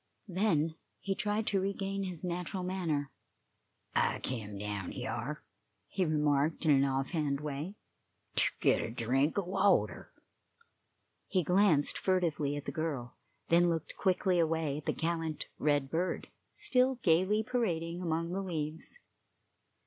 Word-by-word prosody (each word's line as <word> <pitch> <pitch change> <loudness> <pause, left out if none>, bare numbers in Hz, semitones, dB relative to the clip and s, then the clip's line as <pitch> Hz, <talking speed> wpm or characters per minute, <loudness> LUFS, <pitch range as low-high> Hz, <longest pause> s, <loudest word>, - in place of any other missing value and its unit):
Then 170 -5 +1 0.2
he 195 - -1
tried 210 +2 0
to 195 -3 +1
regain 195 0 -2
his 180 -3 -5
natural 180 +1 -3
manner. 165 -7 -1 0.8
"I - - +2
kem 105 -5 -4
down 100 -2 -4
hyar," - - -4 0.4
he 185 -1 0
remarked, 150 0 +1
in 155 - +5
an 135 -1 +5
off 135 0 0
hand 150 -5 0
way, 150 +6 -4 0.6
"ter - - +4
git - - +4
a - - -3
drink 125 - +1
o' 200 - +2
water." 195 +2 +2 1.2
He 185 -3 +1
glanced 180 -4 +3
furtively 165 -6 +1
at 145 - -5
the - - -3
girl, 145 -7 -3 0.3
then 175 +1 +5
looked 165 -2 -2
quickly 185 -1 +2
away 160 -3 +1
at 150 - -13
the - - +3
gallant 160 -2 -2
red 145 -2 +1
bird, 175 +3 -1 0.3
still 255 0 +3
gayly 185 +6 +3
parading 175 -8 -1
among 165 0 -1
the 195 +2 -1
leaves. 160 - -3
165 Hz, 140 wpm, -32 LUFS, 145-185 Hz, 1.2 s, in